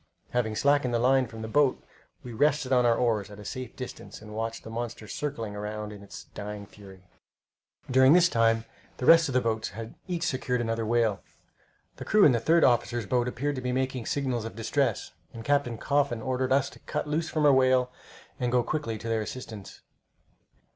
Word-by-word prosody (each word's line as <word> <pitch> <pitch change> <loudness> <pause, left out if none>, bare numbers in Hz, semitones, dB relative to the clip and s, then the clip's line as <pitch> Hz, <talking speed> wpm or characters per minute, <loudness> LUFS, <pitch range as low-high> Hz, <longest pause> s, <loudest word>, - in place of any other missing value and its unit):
Having 115 -3 0
slackened 140 -2 +2
the - - +3
line 130 +2 +3
from 110 0 -9
the - - -4
boat, 135 +3 +2 0.4
we 125 - -8
rested 140 +1 +1
on 125 -1 +4
our 115 - +4
oars 110 -5 0
at 105 - -11
a 105 - -11
safe 130 0 -6
distance 125 - -8
and 105 0 -11
watched 115 +1 -4
the 110 - -9
monster 115 -1 -5
circling 115 -4 -4
around 105 +1 -5
in 100 - -11
its 100 - -10
dying 105 0 -6
fury. 95 -2 -15 0.8
During 130 +2 +6
this 180 0 +6
time 115 -5 +2 0.3
the 125 - -4
rest 165 0 +7
of - - -3
the 125 - +3
boats 110 -2 -1
had 110 +2 -8
each 175 -2 -2
secured 130 -4 -1
another 115 -1 -2
whale. 110 -5 +1 0.8
The - - -7
crew 215 -1 +5
in 145 - +7
the 120 - +2
third 165 +8 +3
officer's 120 -2 +2
boat 120 +5 +1
appeared 140 +4 -2
to - - -3
be 125 0 -2
making 130 -2 -2
signals 130 -5 -1
of 115 - -7
distress, 115 0 -1 0.2
and 115 0 -8
Captain 140 -5 +1
Coffin 140 -2 0
ordered 130 0 -1
us 140 +1 +2
to - - -15
cut - - -4
loose 155 +2 -1
from 155 -2 0
our 145 - +7
whale 130 -1 +3 0.5
and 125 -1 0
go 125 -1 +3
quickly 130 -7 -3
to 115 - -8
their 115 -1 0
assistance. 110 -3 -8
120 Hz, 200 wpm, -27 LUFS, 110-130 Hz, 0.8 s, rest